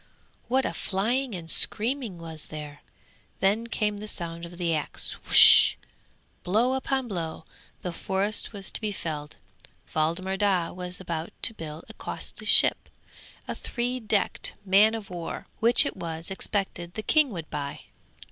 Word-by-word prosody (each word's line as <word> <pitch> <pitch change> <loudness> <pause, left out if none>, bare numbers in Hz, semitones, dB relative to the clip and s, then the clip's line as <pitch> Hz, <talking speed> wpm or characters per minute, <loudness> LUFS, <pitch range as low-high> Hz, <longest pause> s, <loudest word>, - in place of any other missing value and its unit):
What 260 +1 +1
a - - -2
flying 230 +5 -1
and 170 -2 -7
screaming 225 +2 +3
was 160 -2 -9
there! 150 -2 -9 0.6
Then 210 +5 +1
came 210 -3 -1
the 215 - -7
sound 170 -3 -5
of 175 0 -13
the 170 -2 0
axe, 155 -2 -4 1.3
blow 225 +8 +2
upon 265 -1 -1
blow; 165 -5 -5 0.4
the 180 - -4
forest 195 +4 -2
was 200 -3 -6
to - - -3
be 215 -1 -2
felled. 150 -6 -5 0.6
Waldemar 170 +5 0
Daa 190 -4 +1
was 180 0 -6
about 170 -3 -4
to - - +6
build 160 -4 -8
a - - -11
costly - - -7
ship, - - +4 0.6
a - - -3
three 245 +1 -3
decked 210 -4 -1
man 205 +4 +5
of 210 -4 -8
war, 170 -2 -6
which 235 +2 +6
it - - -3
was 165 0 -5
expected 190 -3 -3
the 215 - -4
king 305 +2 +3
would 170 -8 -6
buy. 140 -1 -5
190 Hz, 150 wpm, -26 LUFS, 165-220 Hz, 1.3 s, to